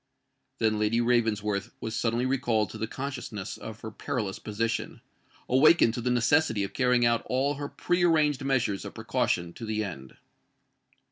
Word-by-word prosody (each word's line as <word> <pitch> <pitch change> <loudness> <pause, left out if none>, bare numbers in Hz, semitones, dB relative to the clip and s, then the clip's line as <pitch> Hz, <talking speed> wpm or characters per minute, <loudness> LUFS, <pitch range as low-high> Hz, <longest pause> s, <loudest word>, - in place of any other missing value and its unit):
Then 110 -1 +1
Lady 105 +2 +2
Ravensworth 105 -4 0
was 110 0 -4
suddenly 120 +2 0
recalled 120 -5 +1
to 110 - -8
the 110 - -2
consciousness 125 -7 -5
of 110 0 -9
her 110 - -6
perilous 110 -4 -3
position,—awakened 115 +5 +1
to 120 - -3
the 125 - -1
necessity 125 -2 +2
of 100 - -5
carrying 125 -2 +3
out 115 0 +3
all 135 +3 +1
her 145 0 -5
pre 175 0 0
arranged 155 -5 +3
measures 130 -7 0
of - - -8
precaution 85 0 -1
to 115 - -10
the 110 -1 -1
end. 70 -10 -8
115 Hz, 155 wpm, -28 LUFS, 105-130 Hz, -, carrying